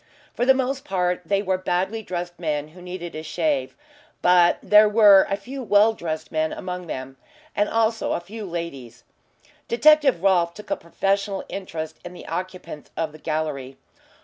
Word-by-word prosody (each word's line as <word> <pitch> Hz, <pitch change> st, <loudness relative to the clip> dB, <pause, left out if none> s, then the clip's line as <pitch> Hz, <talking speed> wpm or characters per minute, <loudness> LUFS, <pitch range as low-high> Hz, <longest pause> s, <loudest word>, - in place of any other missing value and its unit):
For 245 Hz, -, -1 dB
the 265 Hz, -, +7 dB
most 265 Hz, +1 st, -1 dB
part 180 Hz, -2 st, -1 dB
they 200 Hz, 0 st, +1 dB
were 190 Hz, -1 st, 0 dB
badly 185 Hz, +4 st, -1 dB
dressed 175 Hz, -3 st, -5 dB
men 150 Hz, -3 st, -2 dB
who 180 Hz, +3 st, -15 dB
needed 180 Hz, -1 st, -7 dB
a 155 Hz, -, -5 dB
shave, 155 Hz, -4 st, -1 dB, 0.5 s
but 175 Hz, -1 st, +5 dB
there 210 Hz, 0 st, +6 dB
were 205 Hz, -3 st, +7 dB
a 195 Hz, -, 0 dB
few 260 Hz, +7 st, -8 dB
well 215 Hz, -1 st, +4 dB
dressed 160 Hz, -6 st, -5 dB
men 155 Hz, 0 st, 0 dB
among 180 Hz, -1 st, -6 dB
them, 130 Hz, -2 st, -6 dB, 0.4 s
and 205 Hz, 0 st, +1 dB
also 225 Hz, 0 st, +1 dB
a -, -, -1 dB
few 210 Hz, +5 st, -9 dB
ladies. 140 Hz, -9 st, -6 dB, 0.6 s
Detective 280 Hz, -, +4 dB
Rolfe 175 Hz, -3 st, +3 dB
took 210 Hz, -, -11 dB
a -, -, +3 dB
professional 195 Hz, +3 st, -2 dB
interest 160 Hz, -5 st, -6 dB
in 175 Hz, -, -8 dB
the 180 Hz, -, -11 dB
occupants 180 Hz, -3 st, -6 dB
of 160 Hz, -2 st, -1 dB
the 155 Hz, -, -14 dB
gallery. 150 Hz, -4 st, -3 dB
180 Hz, 170 wpm, -23 LUFS, 160-205 Hz, 0.6 s, the